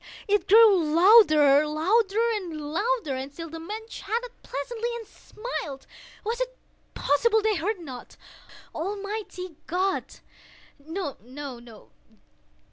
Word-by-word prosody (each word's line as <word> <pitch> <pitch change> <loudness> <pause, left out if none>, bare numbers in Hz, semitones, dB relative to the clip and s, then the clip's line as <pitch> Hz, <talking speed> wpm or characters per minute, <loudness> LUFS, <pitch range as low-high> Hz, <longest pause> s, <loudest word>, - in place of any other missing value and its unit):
It 415 0 +1
grew 420 -4 +7
louder—louder—louder! 340 - +3
And 265 +2 -5
still 330 +2 -8
the 325 - -7
men 425 +7 -7
chatted 470 +1 -4
pleasantly, 455 - -4
and 465 -1 -7
smiled. 350 - -7 0.4
Was 460 +3 -2
it - - -3 0.4
possible 435 +9 +2
they 435 0 +3
heard 395 +7 -1
not? 260 -7 -10 0.6
Almighty 390 -1 -5
God!—no, 350 -3 -5
no! 245 -3 -10
370 Hz, 95 wpm, -26 LUFS, 300-440 Hz, 0.6 s, grew